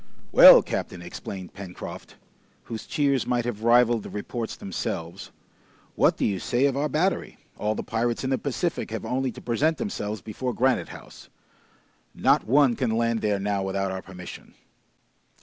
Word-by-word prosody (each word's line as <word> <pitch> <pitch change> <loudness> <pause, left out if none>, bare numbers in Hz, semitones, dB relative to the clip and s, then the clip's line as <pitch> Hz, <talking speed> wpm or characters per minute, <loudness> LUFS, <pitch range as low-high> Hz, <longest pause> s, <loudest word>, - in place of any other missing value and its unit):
"Well, - - +10
captain," 90 -1 -4
exclaimed 95 +1 -8
Pencroft, 95 -2 -9 0.5
whose 110 -1 -7
cheers 140 -3 +1
might 120 -1 0
have 115 -3 -4
rivaled 120 -1 +4
the - - -9
reports 115 +2 -5
themselves, 85 -3 -5 0.6
"what - - +3
do - - 0
you 100 -3 0
say 125 +8 +1
of 140 -2 +1
our 145 +2 0
battery? 170 +7 -1 0.2
All 105 +1 0
the - - -4
pirates 115 +2 -1
in 130 - -1
the 130 - +1
Pacific 145 +5 -2
have 110 0 -5
only 130 0 -1
to - - -11
present 150 +7 +1
themselves 110 - -4
before 120 +3 -4
Granite 130 0 +1
House! - - -12 0.9
Not - - +2
one 135 0 +4
can 125 -1 -1
land 115 -1 0
there 105 -1 +1
now 100 0 -1
without 95 0 -2
our 95 0 -4
permission!" 90 -2 -11
115 Hz, 165 wpm, -25 LUFS, 100-130 Hz, 0.9 s, Well